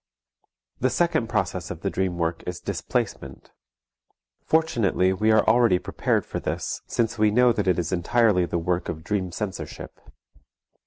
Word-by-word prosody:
The 130 - +2
second 150 -8 +1
process 95 -6 -1
of - - -7
the - - -2
dream 95 -2 -1
work 85 0 -1
is 90 -1 -4
displacement. - - -4 0.9
Fortunately 115 - +2
we 110 +4 +2
are 110 -1 +3
already 115 -4 +5
prepared 90 - -1
for - - -4
this, - - -3
since 115 -1 -1
we 110 0 +4
know 125 +3 +4
that 105 -2 -2
it 90 - +3
is 85 -3 -2
entirely 95 +1 +2
the 85 - -2
work 85 +1 -1
of 80 -1 -5
dream 95 0 -2
censorship. 95 +1 -6
95 Hz, 155 wpm, -24 LUFS, 90-115 Hz, 0.9 s, already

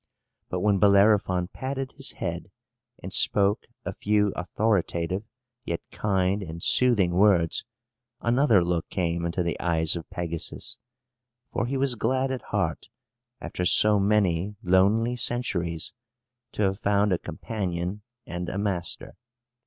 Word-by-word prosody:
But 90 - -2
when 100 -1 +2
Bellerophon 100 -3 +4
patted 135 +3 -4
his - - -2
head, - - -5 0.5
and - - -5
spoke 100 +1 +3 0.2
a - - -3
few 105 -1 +1
authoritative 90 -1 0 0.4
yet 85 - -3
kind 95 -1 0
and 85 -2 -7
soothing 115 -8 +3
words, 90 -3 +3 0.6
another 120 -5 +3
look 85 -1 -1
came 85 -2 -1
into 85 +2 -1
the 85 - -2
eyes 80 -2 +1
of 85 -1 -7
Pegasus; 85 -2 -3 0.7
for 115 - -1
he 135 +2 -1
was 135 -1 +3
glad 130 +3 0
at 130 - -3
heart, 95 -6 -2 0.5
after 90 - -4
so 105 +3 +5
many 100 -2 +1
lonely 100 +6 +3
centuries, 90 -10 -1 0.6
to 105 - -1
have 95 0 0
found 100 -1 +2
a 90 - 0
companion 90 +1 -4 0.2
and 90 0 -5
a - - -4
master. 100 -4 -2
95 Hz, 130 wpm, -26 LUFS, 85-105 Hz, 0.7 s, so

